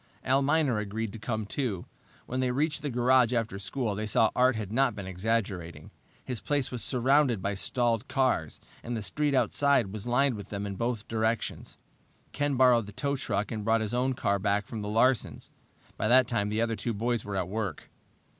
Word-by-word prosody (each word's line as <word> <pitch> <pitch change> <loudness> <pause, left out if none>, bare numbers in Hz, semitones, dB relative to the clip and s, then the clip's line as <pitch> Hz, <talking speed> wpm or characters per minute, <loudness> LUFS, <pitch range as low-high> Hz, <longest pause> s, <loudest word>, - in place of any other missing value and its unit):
Al 135 +1 +3
Miner 140 -5 +2
agreed 105 0 -4
to 115 - -8
come, 110 -1 -3
too. 105 -5 -3 0.4
When 130 - -3
they 130 -1 +1
reached 150 +4 0
the 145 - -3
garage 125 0 +3
after 115 -4 -1
school 105 +3 -2
they 105 +2 -3
saw 110 +1 +3
Art 130 0 +4
had 105 -2 -4
not 125 -1 +2
been 100 -2 -6
exaggerating. 95 -5 -3 0.3
His 125 -3 -4
place 140 -3 -1
was 125 -2 -4
surrounded 130 -1 +3
by 100 +2 -2
stalled 115 +4 0
cars, 130 - 0 0.2
and 120 0 -4
the 110 - -4
street 145 +9 0
outside 130 -6 +2
was 110 +2 -5
lined 130 +2 +3
with 100 -3 -8
them 100 0 -4
in 100 - -4
both 115 +2 -3
directions. 110 0 -2 0.5
Ken 145 -1 -1
borrowed 125 -4 +4
the - - -8
tow 140 +6 -1
truck 105 -6 -2
and 110 -2 -4
brought 115 +1 +2
his 110 0 -3
own 130 +1 +1
car 100 -4 0
back 100 +1 0
from 110 +1 -6
the 105 - -4
Larsens'. 115 +3 +1 0.5
By - - 0
that 125 +1 +6
time 105 -4 0
the 110 +2 0
other 115 -1 0
two 115 +1 -3
boys 115 +1 -1
were 100 -1 -5
at 95 -2 -1
work. 100 -5 -4
115 Hz, 200 wpm, -28 LUFS, 105-130 Hz, 0.5 s, that